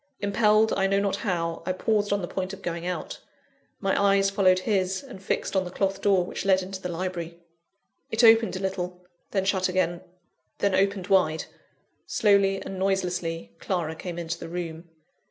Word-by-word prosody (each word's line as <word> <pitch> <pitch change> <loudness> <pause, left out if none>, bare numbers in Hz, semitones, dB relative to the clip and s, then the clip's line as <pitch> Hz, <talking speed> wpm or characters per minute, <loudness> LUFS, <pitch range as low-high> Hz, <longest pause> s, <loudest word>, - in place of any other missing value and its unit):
Impelled, 210 +2 +3
I 195 0 +2
know 195 0 +2
not 200 -1 0
how, 170 -5 -2
I 185 +2 -1
paused 205 +2 0
on 205 -2 0
the - - -2
point 190 +1 -4
of 195 - -10
going 170 0 -3
out. 180 - -4 0.6
My 195 0 +1
eyes 195 0 +4
followed 190 -2 +4
his, 190 0 0
and 250 -9 -11
fixed 195 - -2
on 190 - +3
the 180 - -6
cloth 195 +1 -1
door 195 -3 +3
which - - -5
led 190 -1 +3
into 190 0 -7
the 180 - -4
library. 170 -1 -4 0.7
It 220 +2 +1
opened 225 -2 +6
a - - -3
little 180 -2 -4 0.2
then 195 -2 0
shut 190 -1 +1
again 175 -2 0 0.6
then 200 -1 +1
opened 195 -1 +1
wide. 180 -5 +2 0.6
Slowly 200 -2 +3
and 190 - -6
noiselessly, 180 -3 -1
Clara 170 -4 -2
came 175 +1 -6
into 170 0 -4
the - - -7
room. 170 -1 -6
190 Hz, 180 wpm, -26 LUFS, 180-195 Hz, 0.7 s, opened